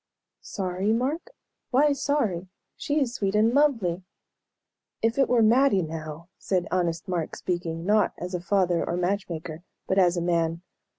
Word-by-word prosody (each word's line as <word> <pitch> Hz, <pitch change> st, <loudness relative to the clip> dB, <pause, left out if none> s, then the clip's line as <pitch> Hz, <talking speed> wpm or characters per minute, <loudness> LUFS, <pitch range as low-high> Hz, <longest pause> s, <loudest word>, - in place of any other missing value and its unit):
"Sorry, 190 Hz, +1 st, -2 dB
Mark? 280 Hz, -, -1 dB, 0.4 s
Why 285 Hz, +3 st, +4 dB
sorry? 265 Hz, -11 st, -1 dB, 0.3 s
She 295 Hz, +1 st, -1 dB
is 255 Hz, -5 st, 0 dB
sweet 200 Hz, -4 st, -1 dB
and 220 Hz, +2 st, +3 dB
lovely!" 230 Hz, -, +2 dB, 1.0 s
"If 225 Hz, +4 st, +1 dB
it 270 Hz, -, +3 dB
were 240 Hz, -2 st, +4 dB
Mattie, 230 Hz, -3 st, +4 dB
now," 155 Hz, +1 st, -7 dB
said 185 Hz, -2 st, -1 dB
honest 175 Hz, -1 st, -1 dB
Mark, 175 Hz, -4 st, -2 dB
speaking, 170 Hz, -2 st, -3 dB
not 210 Hz, 0 st, +3 dB
as 180 Hz, +1 st, -6 dB
a 180 Hz, -, -2 dB
father 180 Hz, -2 st, +1 dB
or 175 Hz, -, -2 dB
match 190 Hz, +3 st, -1 dB
maker, 160 Hz, -1 st, -6 dB, 0.2 s
but 190 Hz, -, +1 dB
as 180 Hz, -1 st, +3 dB
a -, -, +2 dB
man. 170 Hz, -1 st, 0 dB
185 Hz, 160 wpm, -26 LUFS, 170-230 Hz, 1.0 s, Why